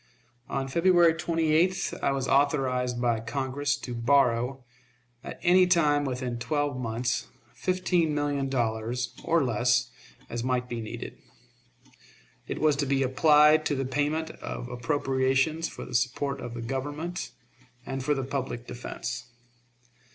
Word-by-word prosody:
On 135 -1 -2
February 170 +3 +4
28th 165 +2 +1
I 140 - +2
was 135 -1 -1
authorized 130 -3 +1
by 120 -2 +1
Congress 140 +4 -2
to 125 - -7
borrow, 125 +1 +2 0.6
at - - -8
any 180 +1 +5
time 150 -5 +3
within 125 -2 -3
twelve 145 +1 -1
months, 120 0 -2 0.3
fifteen 180 -4 0
million 145 -2 -1
dollars, 120 0 -1
or 165 -2 +2
less, 125 +1 +1 0.4
as 120 0 -4
might 125 -1 0
be 120 -2 -4
needed. 110 - -7 1.3
It - - -4
was 155 -2 +3
to 140 -1 0
be 135 0 +2
applied 150 +3 +5
to 145 - 0
the 135 0 -2
payment 150 +4 -1
of 120 - -7
appropriations 135 +4 0
for - - -8
the 125 - -10
support 135 +2 0
of 120 -1 -6
the 115 - -5
Government, 145 +8 -4 0.6
and 135 -1 -4
for 150 +2 +1
the 135 - -2
public 130 -3 -4
defense. 125 +1 -6
135 Hz, 135 wpm, -27 LUFS, 125-150 Hz, 1.3 s, any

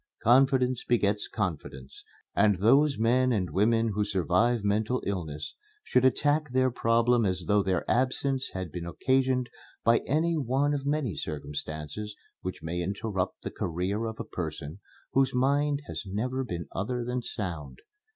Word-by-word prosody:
Confidence 130 0 +4
begets 105 -3 +1
confidence, 70 - -5 0.3
and 100 -1 +4
those 135 +9 +4
men 125 +3 +3
and 95 -6 0
women 115 +3 +3
who 105 0 0
survive 100 +4 +1
mental 110 +5 0
illness 80 -6 -4 0.3
should 125 - +2
attack 145 +3 +2
their 130 0 +2
problem 115 +1 +2
as 95 -3 0
though 105 0 +4
their 95 -2 0
absence 130 +2 +1
had 95 -4 -4
been 85 +1 -5
occasioned 130 +5 +1 0.4
by 115 0 +5
any 160 +5 +2
one 135 +2 +1
of 140 -1 -3
the - - 0
many 145 -8 -1
circumstances 75 +6 -5 0.3
which 95 - -6
may 85 +2 -2
interrupt 95 0 -3
the - - -4
career 95 +6 -2
of 110 -1 -5
a - - -2
person 80 -3 -5 0.3
whose 135 -1 +2
mind 140 +3 +2
has - - -5
never 125 +7 -2
been 85 -9 -5
other 120 +6 -2
than 125 +1 -2
sound. 85 - -5
115 Hz, 150 wpm, -28 LUFS, 95-130 Hz, 0.4 s, by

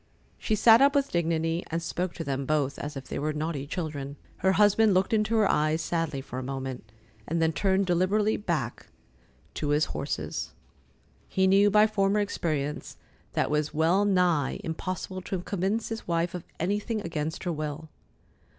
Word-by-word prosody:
She 220 - 0
sat 225 +3 +7
up 280 +1 +5
with 280 -1 +1
dignity, 165 0 0
and 165 - -1
spoke 175 +1 -3
to 165 - -4
them 135 -2 -3
both 145 -3 0
as 145 0 -5
if 135 - -6
they - - -4
were 155 +2 -1
naughty 150 -2 -3
children. 145 -4 -4 0.2
Her 190 0 +2
husband 210 +1 +4
looked 190 +4 +2
into 215 +1 +2
her 215 -3 +4
eyes 155 -1 +2
sadly 165 -4 -2
for 130 -1 -6
a - - -5
moment, 130 -4 -5 0.4
and 165 +2 -1
then 160 0 +2
turned 195 +3 +2
deliberately 190 +5 +2
back 205 - -3 0.7
to 150 - -3
his 150 +1 +3
horses. - - -4 0.7
He 190 - +2
knew 195 +2 +5
by 210 +1 +6
former 205 -1 +1
experience 155 -7 -2 0.4
that - - +2
it - - -4
was 150 0 0
well 165 +6 +3
nigh 180 -8 +2
impossible 185 +2 -4
to 185 0 -4
convince 200 +4 -1
his 225 0 -6
wife 170 0 0
of 180 - -6
anything 205 +5 -1
against 160 -3 -4
her 175 - -1
will. 155 0 -4
170 Hz, 175 wpm, -27 LUFS, 150-200 Hz, 0.7 s, sat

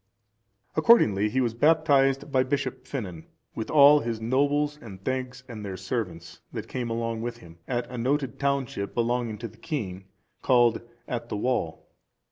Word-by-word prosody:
Accordingly 105 - +5
he 130 +4 +1
was 120 -3 0
baptized 140 0 +3
by 130 - +4
Bishop 135 +2 -2
Finan, 95 - -6 0.3
with 110 - -5
all 150 0 +7
his 115 -5 -3
nobles 145 +5 +1
and 100 -7 -10
thegns,(404) 130 0 -3
and 110 -3 -7
their 95 -2 -5
servants, 95 -4 -4
that - - -6
came 125 -2 -3
along 115 0 -2
with 120 0 -4
him, 85 -6 -15
at 120 -1 -2
a 125 -1 -6
noted 135 0 -1
township, 140 -8 -1
belonging 120 -2 0
to 115 - -5
the 110 +1 -17
king, 105 - -4 0.4
called 120 -3 +4 0.3
At 120 -1 -4
the - - -2
Wall. 110 -8 -2
120 Hz, 160 wpm, -26 LUFS, 110-135 Hz, 0.4 s, all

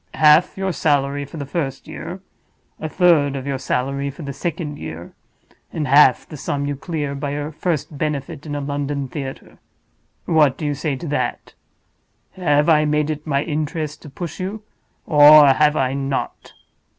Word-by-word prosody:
Half 155 +4 +5
your 190 -1 -1
salary 145 -1 0
for 160 - -10
the 140 - -4
first 135 -2 -4
year; 175 +4 -7 0.6
a 155 - -4
third 155 -6 +3
of 135 -1 -5
your 140 -2 -2
salary 135 +2 -2
for 145 +4 -9
the 140 -1 -5
second 150 0 -4
year; 80 +2 -8 0.6
and 150 -3 -3
half 140 -1 +5
the 155 - -9
sum 140 +1 -3
you 145 0 -2
clear 145 -1 -4
by 140 0 -4
your 145 +1 -4
first 155 -2 -3
benefit 150 0 -3
in 145 - -4
a 145 - -3
London 140 0 -3
theater. 135 0 -8 0.7
What 150 -5 +3
do 155 - -5
you 145 - 0
say 145 0 -2
to 165 +5 -7
that? 130 -4 -3 0.8
Have 150 -5 +1
I 155 -2 +5
made 150 0 +1
it 150 +1 -6
my 140 -1 +1
interest 155 0 -3
to 150 - -11
push 170 +5 -7
you, 200 +4 -5 0.4
or 150 -1 +8
have 150 +3 +3
I 130 0 +1
not?" 135 0 -4
145 Hz, 175 wpm, -20 LUFS, 140-155 Hz, 0.8 s, or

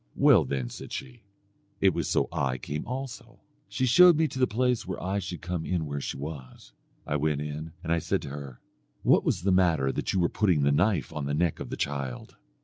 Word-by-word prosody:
'Well, 135 - +5
then,' 65 -2 -3
said - - -9
she, 125 -4 -7 0.6
'it 95 -2 +4
was - - -2
so - - +2
I 65 -2 -1
came 75 +4 -5
also.' 130 0 -6 0.3
She 130 - 0
showed 175 +6 +7
me 160 0 +3
to 130 - -6
the 130 - +4
place 125 -1 0
where 95 - -4
I 95 +3 -1
should 90 -4 -6
come 85 -1 -3
in 85 -1 -1
where 70 -1 -4
she - - -4
was. 70 -3 -8 0.3
I 75 - 0
went 75 0 0
in, 75 +2 -6
and 85 0 0
I 85 - +2
said - - -1
to - - -6
her, 70 -3 -8 0.4
'What - - +4
was - - 0
the 95 - +2
matter 85 -7 +3
that - - -2
you 95 - +1
were 85 - +3
putting 90 -9 +2
the 70 - +3
knife 90 +2 +1
on 75 -2 -3
the 70 - -1
neck 85 +1 0
of - - -6
the - - -5
child?' 70 -4 -4
80 Hz, 230 wpm, -28 LUFS, 70-105 Hz, 0.6 s, showed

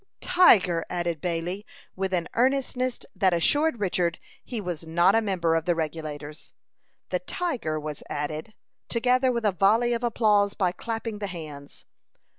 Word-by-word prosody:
"Tiger!" 190 - +5
added 170 -3 -2
Bailey, 175 +3 -2 0.3
with 190 0 -2
an 175 -3 0
earnestness 255 0 0
that 185 -3 +3
assured 290 - +2
Richard 180 -3 0 0.3
he 240 - -4
was 175 -5 -4
not 170 +4 +3
a 225 - +4
member 180 -6 0
of 165 -1 0
the 175 - +2
Regulators. 155 -1 -5 0.6
The - - 0
"tiger" 235 - -3
was 150 -1 -6
added, 155 +8 -4 0.3
together 255 +2 +2
with 235 -2 -2
a 210 - +4
volley 215 +6 +3
of 235 0 -2
applause 210 -4 +2
by 185 -3 +1
clapping 225 +2 -5
the 205 - -3
hands. 155 -6 -9
190 Hz, 150 wpm, -26 LUFS, 165-230 Hz, 0.6 s, Tiger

